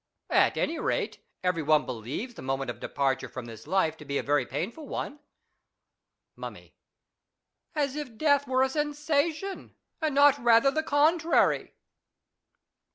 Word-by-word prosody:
At - - +4
any 330 - 0
rate, - - -1 0.2
every 180 -3 +1
one 155 0 +3
believes 130 - -5
the - - -10
moment 135 -1 -2
of 115 - -11
departure 135 0 -1
from 130 -2 -7
this 115 +2 -11
life 165 -3 +2
to 150 - -11
be 140 -1 -2
a - - -1
very 145 +1 +1
painful 235 - -4
one. 295 - -5 1.2
Mummy. - - -9 1.0
As 285 -2 0
if 275 -7 -6
death 285 -1 +3
were 260 0 +3
a 265 - +2
sensation, 300 +5 -1 0.3
and 310 -3 0
not 285 0 +6
rather 235 +3 +5
the 315 - 0
contrary. 315 +3 +2
260 Hz, 145 wpm, -28 LUFS, -, 1.2 s, not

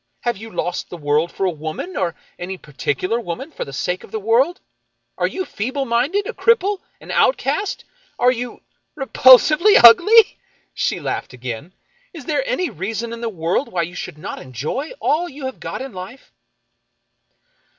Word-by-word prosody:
Have 240 -1 0
you 220 +3 -10
lost 180 -4 -3
the 175 - -7
world 150 +2 +1
for 195 - -2
a 185 - +2
woman, 155 - -6
or 175 -3 -1 0.2
any 185 +2 -5
particular 150 - -2
woman 240 - -6
for - - -5
the 140 - -9
sake 180 +7 -2
of - - -13
the 220 - -4
world? 240 - +2 0.6
Are - - 0
you 375 - -4
feeble 265 - -3
minded, 270 - +1
a - - -4
cripple, 415 -4 +2 0.2
an - - -9
outcast? 415 -4 +1 0.3
Are 250 +1 +4
you 245 0 -5 0.2
— - - -51
repulsively 275 - +6
ugly? 405 - +8 0.2
" - - -40
She - - 0
laughed - - -4
again. 125 +7 -7 0.2
" - - -37
Is 295 -6 -9
there 310 - 0
any 370 -8 -1
reason 225 +6 -4
in 235 - -7
the 230 - -2
world 175 - -1
why 175 -2 0
you 170 +2 -6
should 175 - -7
not 175 +6 -6
enjoy 140 - -4
all 345 +4 +1
you 280 0 -8
have 260 - -5
got - - -5
in 265 -4 -8
life 185 +8 -10
235 Hz, 180 wpm, -20 LUFS, -, 0.6 s, ugly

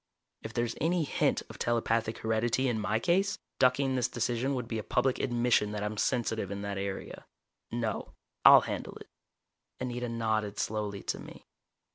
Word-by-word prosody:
If 110 - -6
there's 120 -1 0
any 170 +2 +2
hint 145 - +1
of - - -11
telepathic 115 -1 0
heredity 115 +4 +1
in 120 -3 0
my 105 +1 +1
case, 190 - +1 0.2
ducking 130 +1 +3
this 125 -2 +1
decision 120 +3 -1
would 125 -3 -3
be 115 -2 -2
a - - -5
public 125 +4 +1
admission 120 -4 +2
that 105 -1 -3
I'm 105 +1 -2
sensitive 110 -3 0
in 100 0 -5
that 100 -1 -3
area. 100 -1 -5 0.4
No. 115 -3 -3 0.3
I'll - - +10
handle - - -5
it." - - -12 0.7
Anita 125 -1 -3
nodded 110 -3 -1
slowly 105 -2 -2
to - - -2
me. - - -11
115 Hz, 165 wpm, -30 LUFS, 110-125 Hz, 0.7 s, I'll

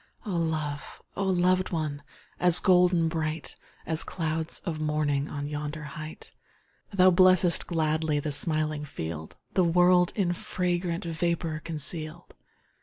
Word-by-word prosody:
Oh 210 - -4
love! 155 -3 -3 0.2
oh 195 - -1
loved 185 0 +2
one! 155 -4 -3 0.4
As 180 -1 +6
golden 180 -3 +4
bright, 160 -1 -3 0.3
As 160 0 -1
clouds 160 -1 -2
of 165 -4 -3
morning 150 -2 0
On 145 -1 -4
yonder 150 +1 -5
height! 155 +1 -9 0.6
Thou 185 -2 +5
blessest 185 -1 +4
gladly 155 -2 0
The 150 +1 -3
smiling 155 0 -1
field, 80 - -6 0.2
The 185 - +3
world 180 +1 +4
in 185 -4 +1
fragrant 175 -1 -2
Vapour 165 -1 -1
conceal'd. 160 +1 -2
160 Hz, 125 wpm, -27 LUFS, 155-180 Hz, 0.6 s, As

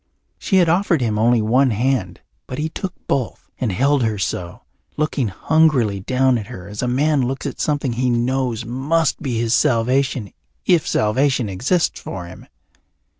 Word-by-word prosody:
She 195 - -1
had 180 -3 +5
offered 175 0 +2
him 110 -4 -1
only 115 0 +3
one 130 +5 +3
hand 110 -5 -1 0.3
but 130 - -6
he 155 +1 -2
took 185 +3 -5
both 130 -4 -2
and 120 -5 0
held 140 +7 +2
her 110 -3 0
so, 90 -2 -4 0.3
looking 150 -5 0
hungrily 125 -2 +2
down 130 +4 +1
at 105 - -8
her 90 +1 -9
as 105 0 -6
a 125 - -1
man 140 +3 +2
looks 130 +3 -3
at 140 - -5
something 145 -4 0
he 125 +2 0
knows 120 -1 0
must 140 +7 0
be 125 -4 -2
his 115 0 0
salvation 125 -1 +1 0.3
if 170 -3 +3
salvation 125 +1 +1
exists 130 - 0
for 90 -2 -6
him. 85 - -12
125 Hz, 170 wpm, -20 LUFS, 110-140 Hz, 0.3 s, had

